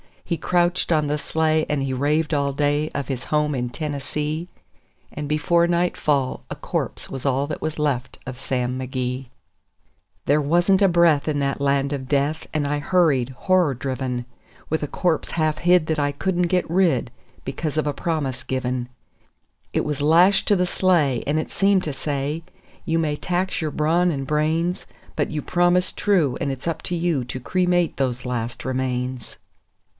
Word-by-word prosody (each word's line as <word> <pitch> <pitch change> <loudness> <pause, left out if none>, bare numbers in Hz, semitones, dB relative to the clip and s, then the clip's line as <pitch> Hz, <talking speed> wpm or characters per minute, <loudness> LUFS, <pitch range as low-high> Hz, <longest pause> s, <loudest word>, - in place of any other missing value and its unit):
He 170 - -1
crouched 175 +2 +1
on 155 -2 +2
the 150 +1 0
sleigh, 155 +1 +1
and 145 -2 0
he 135 -1 -2
raved 150 +4 +1
all 140 -1 +1
day 145 +2 +1
of 140 -1 -2
his 130 -2 -3
home 150 -1 +1
in 125 -2 -2
Tennessee; 150 +3 -3 0.6
And 150 0 -5
before 160 +3 +2
nightfall 155 -6 0
a - - -4
corpse - - -4
was 135 0 -6
all 135 0 +2
that 155 - -5
was 155 0 -3
left 140 -4 -1
of 125 -1 -7
Sam 125 -1 -2
McGee. 130 0 -3 1.0
There 150 +1 +3
wasn't 175 +6 +3
a 195 - +6
breath 170 -5 +4
in 150 -2 0
that 140 0 -1
land 140 0 +1
of 130 -2 -4
death, 145 +3 0
and 150 -2 0
I 145 +1 0
hurried, 145 -7 +2
horror 175 +3 +2
driven, 130 -1 -3 0.4
With 160 - 0
a 150 - -2
corpse 170 +2 -1
half 155 -2 0
hid 175 -2 +4
that 160 -1 0
I 145 0 +1
couldn't 180 +4 0
get 180 +1 +1
rid, 165 -9 +2 0.3
because 150 +3 -3
of 155 - +1
a 145 - 0
promise 140 -7 -2
given; 125 -1 -2 0.9
It - - +1
was 150 -2 -2
lashed 175 +6 +5
to 205 - +5
the 180 -1 +2
sleigh, 170 -9 +2
and 150 +2 +2
it 155 - -4
seemed 195 -1 +3
to 150 - -3
say: 145 +2 -2 0.4
"You 165 - +1
may 155 -2 0
tax 180 +2 -1
your 155 - -1
brawn 165 +5 +2
and 135 -3 -3
brains, 160 +5 0 0.3
But - - +1
you 155 -1 -3
promised 175 +1 +2
true, 175 -11 +2
and 140 - -1
it's 135 +4 -6
up 160 -1 -3
to 180 - -2
you 165 -6 0
to 125 - -5
cremate 180 +4 +1
those 125 -2 -1
last 120 -1 -3
remains." 130 -2 -3
150 Hz, 180 wpm, -23 LUFS, 135-170 Hz, 1.0 s, a